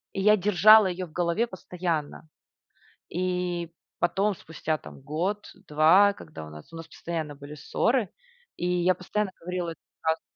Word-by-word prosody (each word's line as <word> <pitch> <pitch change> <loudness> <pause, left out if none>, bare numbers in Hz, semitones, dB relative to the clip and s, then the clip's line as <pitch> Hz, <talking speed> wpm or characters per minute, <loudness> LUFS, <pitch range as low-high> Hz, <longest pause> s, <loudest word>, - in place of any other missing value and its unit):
И 195 - -1
я 210 +1 +6
держала 210 +2 +7
ее 180 0 -3
в 160 - -17
голове 175 +8 0
постоянно. 170 -6 -4 0.8
И 180 -1 -2 0.3
потом, 195 +3 +1
спустя 160 -1 -3
там - - -13
год, 175 +9 -3 0.2
2, 165 +7 +5
когда 80 - -10
у - - -11
нас 75 - -12
у - - -8
нас 165 0 -8
постоянно 160 -3 -5
были 145 +1 -10
ссоры, 230 - 0 0.5
и - - -4
я 180 0 +2
постоянно 195 +2 -2
говорила 180 0 -3
эту - - -12 0.2
фразу. 160 0 0
175 Hz, 155 wpm, -27 LUFS, 160-190 Hz, 0.8 s, держала